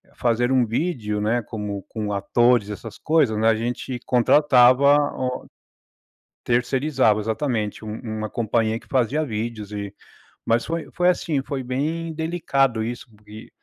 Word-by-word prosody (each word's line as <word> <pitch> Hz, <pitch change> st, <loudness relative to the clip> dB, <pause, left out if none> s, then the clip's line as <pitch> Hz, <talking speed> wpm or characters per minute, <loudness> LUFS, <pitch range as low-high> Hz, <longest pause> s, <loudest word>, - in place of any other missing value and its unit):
fazer 120 Hz, +1 st, +1 dB
um 130 Hz, -2 st, +3 dB
vídeo, 110 Hz, -5 st, -2 dB
né, 115 Hz, +3 st, +1 dB
como 105 Hz, -3 st, -5 dB
com 105 Hz, -2 st, -4 dB
atores, 115 Hz, +2 st, +2 dB
essas 105 Hz, +2 st, -8 dB
coisas, 150 Hz, -9 st, +2 dB
né, 110 Hz, +1 st, +2 dB
a 110 Hz, -, +4 dB
gente 120 Hz, +2 st, -4 dB
contratava 130 Hz, +2 st, +5 dB, 0.2 s
o 125 Hz, -1 st, -3 dB, 1.0 s
terceirizava, 125 Hz, -2 st, +1 dB
exatamente, 110 Hz, -2 st, -2 dB
um 110 Hz, +1 st, -6 dB, 0.2 s
uma 110 Hz, -1 st, -4 dB
companhia 115 Hz, 0 st, 0 dB
que -, -, -22 dB
fazia 135 Hz, +4 st, +1 dB
vídeos 110 Hz, -3 st, -5 dB
e 100 Hz, -1 st, -5 dB, 0.5 s
mas 115 Hz, +1 st, +2 dB
foi 165 Hz, -1 st, -4 dB
foi 180 Hz, 0 st, +3 dB
assim, 160 Hz, -5 st, 0 dB
foi 135 Hz, -1 st, -4 dB
bem 155 Hz, +6 st, -2 dB
delicado 140 Hz, -8 st, 0 dB
isso 120 Hz, +2 st, -6 dB
porque 105 Hz, 0 st, -13 dB
120 Hz, 140 wpm, -23 LUFS, 110-135 Hz, 1.0 s, contratava